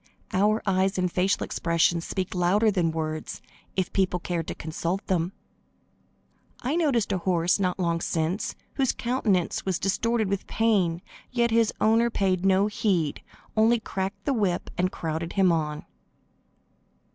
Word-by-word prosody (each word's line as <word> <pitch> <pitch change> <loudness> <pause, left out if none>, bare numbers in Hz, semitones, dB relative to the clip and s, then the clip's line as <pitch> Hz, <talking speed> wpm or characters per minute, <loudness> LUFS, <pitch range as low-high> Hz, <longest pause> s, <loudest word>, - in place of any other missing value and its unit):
Our 210 +4 +2
eyes 190 -1 +1
and 180 -1 0
facial 190 +3 +1
expressions 170 0 +1
speak 190 -1 -3
louder 195 +5 +3
than 180 -4 +1
words, 155 -1 -4 0.4
if 185 -2 0
only - - -39
people 185 -2 +1
cared 170 -2 -3
to - - -4
consult 170 +5 -3
them. 175 -1 0 1.3
I 270 +5 -1
noticed 275 -12 +1
a 190 - 0
horse, 175 +1 +1
not 180 -2 0
long 170 -2 0
since, 165 +5 -1 0.2
whose 265 -3 +2
countenance 225 -8 0
was 190 -3 0
distorted 220 +3 0
with 195 0 -2
pain, 195 -6 +1 0.3
yet 235 -2 +1
his 225 -1 +3
owner 225 +2 +4
paid 190 -5 0
no 195 +1 +4
heed, 190 -7 0 0.3
only 225 +2 +4
cracked 195 -1 -4
the 280 - +1
whip 200 -7 -1
and 185 +1 0
crowded 165 +1 -4
him 190 -3 +4
on. 150 -2 -2
190 Hz, 150 wpm, -26 LUFS, 170-215 Hz, 1.3 s, owner